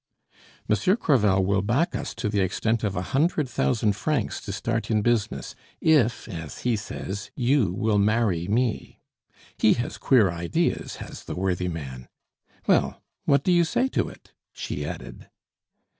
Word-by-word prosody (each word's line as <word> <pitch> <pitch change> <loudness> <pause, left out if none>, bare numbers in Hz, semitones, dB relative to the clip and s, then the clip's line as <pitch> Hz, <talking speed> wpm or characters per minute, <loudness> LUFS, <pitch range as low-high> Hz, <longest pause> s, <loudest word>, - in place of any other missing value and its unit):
"Monsieur 105 - +3
Crevel 105 - +3
will 100 0 +2
back 120 +11 +1
us - - -4
to - - -2
the 105 -1 0
extent 110 +4 0
of 100 -2 -1
a 90 - -1
hundred 150 +1 +2
thousand 110 -4 +1
francs 135 +1 -1
to - - -6
start 115 +3 -2
in 110 -2 +2
business, 120 -2 0 0.3
if, 130 -8 +3
as 80 -4 -7
he 120 -2 +2
says, 100 -1 -5
you 125 -6 +2
will 105 +2 +1
marry 100 -5 +2
me. 115 +2 -1 0.6
He 110 - +5
has 120 - -4
queer 110 -9 +4
ideas, 85 -1 -1
has - - -9
the - - -5
worthy 90 -1 -1
man. 65 -7 -6 0.6
Well, - - +2 0.2
what 140 - +3
do 185 - +2
you 175 -1 +5
say 245 +10 +1
to - - 0
it?" - - -17 0.2
she - - -4
added. - - -8
110 Hz, 160 wpm, -25 LUFS, 95-125 Hz, 0.6 s, He